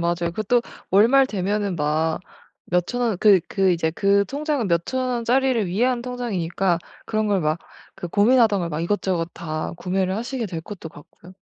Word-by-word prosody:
맞아요. 170 0 0
그것도 235 +3 +1 0.3
월말 235 +8 +5
되면은 200 -3 -1
막 155 +2 0 0.5
몇 180 -1 +2
천 245 - -3
원 225 -5 +1
그 200 -4 +6
그 195 -2 +2
이제 160 -2 0
그 200 +3 +2
통장은 285 - -2
몇 170 0 +1
천 260 - -2 0.2
원짜리를 240 -1 +1
위한 240 +7 +1
통장이니까 195 -8 -1 0.3
그런 215 -1 0
걸 200 -3 +1
막 155 +1 0 0.4
그 175 - -6
고민하던 215 +1 +4
걸 170 - -2
막 150 +1 -3
이것저것 175 -2 -1
다 155 -2 -4
구매를 185 +1 -1
하시게 240 0 -3
될 170 -3 -5
것도 175 -1 -9
같고요. 165 +4 -16
195 Hz, 335 characters per minute, -23 LUFS, 170-235 Hz, 0.5 s, 그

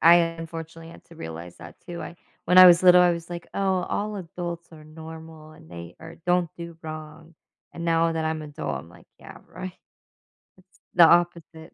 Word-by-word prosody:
I 170 +1 +8
unfortunately 165 -1 -4
had - - -15
to - - -16
realize 80 +2 -8
that 85 - -12
too, 175 -1 -7
I 170 - -9 0.3
When 180 - +3
I 185 - +12
was 175 0 +7
little, 180 0 +8
I 175 - +5
was 170 0 -6
like, 175 -1 -7
"Oh, 190 -2 0
all 210 0 -2
adults 170 -1 -6
are 155 -1 -13
normal 160 0 -11
and 160 0 -17
they 85 0 -10
are - - -11
don't 175 -2 +2
do 170 -1 -9
wrong," 155 +1 -9 0.4
and 170 - -7
now 165 0 +2
that 160 -1 -2
I'm 160 0 -2
adult, 150 - -5
I'm 80 +4 -12
like, - - -18
"Yeah - - -13
right," 185 0 -8 0.8
it's 185 0 -27
the 175 -1 +8
opposite. 170 -1 +1
165 Hz, 195 wpm, -25 LUFS, 160-175 Hz, 0.8 s, I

